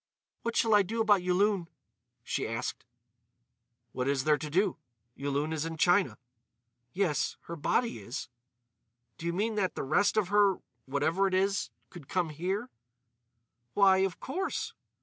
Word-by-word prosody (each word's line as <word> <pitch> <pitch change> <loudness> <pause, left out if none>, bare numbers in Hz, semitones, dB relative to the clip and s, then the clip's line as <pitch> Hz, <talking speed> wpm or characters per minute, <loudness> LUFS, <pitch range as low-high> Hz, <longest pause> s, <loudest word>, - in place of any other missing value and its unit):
"What 235 0 -3
shall 225 -1 +3
I 205 - +7
do 220 +4 -3
about 210 -4 +4
Yulun?" 185 0 +2 0.6
she - - -2
asked. 115 +1 -4 1.1
"What 125 0 -2
is 140 -2 +1
there 150 0 +3
to 150 - -5
do? 185 +6 +1 0.4
Yulun 145 +3 -1
is 155 -1 -1
in 165 0 -4
China." 180 +4 +3 0.7
"Yes, 180 -4 0
her 170 - -7
body 200 - 0
is." 120 +7 -6 0.9
"Do 170 - -4
you - - +1
mean 215 +5 0
that 190 -3 0
the - - -3
rest 200 +10 +2
of 200 -4 +2
her—whatever 170 - +1
it 185 - 0
is—could 190 -5 -2
come 180 -3 0
here?" 190 - -3 1.0
"Why, 195 -2 +6
of 190 -1 0
course." 370 +9 -3
180 Hz, 145 wpm, -30 LUFS, 150-200 Hz, 1.1 s, I